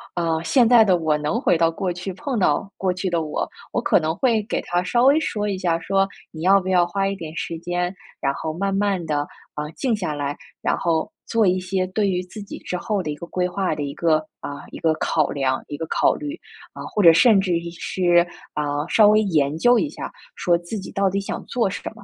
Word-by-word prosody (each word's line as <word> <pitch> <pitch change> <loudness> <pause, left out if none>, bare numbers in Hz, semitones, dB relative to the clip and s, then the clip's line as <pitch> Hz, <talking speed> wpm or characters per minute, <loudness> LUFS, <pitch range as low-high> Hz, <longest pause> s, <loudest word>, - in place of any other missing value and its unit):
呃， 165 -2 0
现 240 - +4
在 235 -1 +7
的 190 -4 +3
我 160 -2 +1
能 150 0 -1
回 - - +2
到 165 0 +3
过 185 +2 -2
去， 180 +2 -5
碰 260 +6 -3
到 180 +2 +1
过 185 -1 0
去 185 +1 -2
的 170 -2 0
我， 150 -1 -2 0.2
我 - - 0
可 - - +3
能 155 +1 -1
会 230 -2 +2
给 215 - -2
她 175 0 0
稍 240 +6 +2
微 280 +3 +6
说 210 -9 -2
一 200 -2 -1
下， 170 -3 0
说： 195 +3 +1 0.3
“你 160 - -9
要 195 +2 +6
不 185 - -7
要 180 -2 +4
花 195 +3 -1
一 195 - -2
点 160 -4 -8
时 165 - -3
间， 175 +1 -2 0.3
然 140 - 0
后 160 +3 -4
慢 195 +3 -1
慢 195 -3 0
地， 155 -2 -1 0.4
啊， 150 0 -4
静 255 -5 +1
下 180 -7 -3
来， 145 -1 -3 0.3
然 - - 0
后 165 -2 0 0.2
做 225 -3 +2
一 185 0 +3
些 185 0 -1
对 200 +2 0
于 180 -1 0
自 185 +4 -10
己 200 - -8
之 180 - -4
后 205 +2 -1
的 155 - -4
一 - - -4
个 160 - -8
规 180 0 -1
划 190 +1 -1
的 145 - -3
一 140 0 -4
个 160 -1 +2 0.2
啊， 145 0 -7
一 - - -8
个 160 -1 +2
考 155 -1 +1
量、 130 -2 -1
一 145 - -6
个 165 - -4
考 - - +3
虑。 295 +2 -5 0.4
“啊， - - -8
或 210 - -1
者 165 -2 +9
甚 210 +5 +6
至 190 -2 0
于 170 0 -2
是， 175 0 +2 0.3
啊， 145 0 -1
稍 215 -2 +6
微 215 +1 +5
研 155 -7 +1
究 240 +7 +5
一 305 - -1
下， - - -7 0.2
说 175 -2 +2
自 170 +6 -6
己 190 - -8
到 195 -1 +1
底 195 +1 -1
想 195 - -5
做 235 -5 0
什 200 - -5
么。 230 - -14
180 Hz, 265 characters per minute, -22 LUFS, 165-200 Hz, 0.4 s, 者